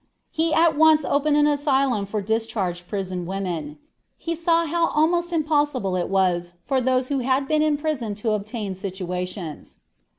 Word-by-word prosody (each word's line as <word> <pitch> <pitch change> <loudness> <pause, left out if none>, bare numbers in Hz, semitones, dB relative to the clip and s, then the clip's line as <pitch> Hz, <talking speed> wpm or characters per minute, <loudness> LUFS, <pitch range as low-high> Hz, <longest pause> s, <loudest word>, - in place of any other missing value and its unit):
He 320 +1 0
at 325 -1 +4
once 310 -1 +5
opened 290 +1 +2
an 295 - +4
asylum 275 -7 +1
for 205 0 -3
discharged 210 -5 -2
prison 185 -3 -4
women. 175 -6 -4 0.4
He 335 0 -3
saw 335 0 +2
how 330 +1 +1
almost 345 +3 +1
impossible 290 - 0
it 180 - -1
was 175 -2 0
for 270 -2 +1
those 255 0 +1
who 280 -2 0
had 265 +2 0
been 305 +1 +2
in 305 -1 +2
prison 280 -9 -2
to 215 +2 -2
obtain 210 -1 -3
situations. 180 -3 -5
255 Hz, 160 wpm, -23 LUFS, 190-300 Hz, 0.4 s, once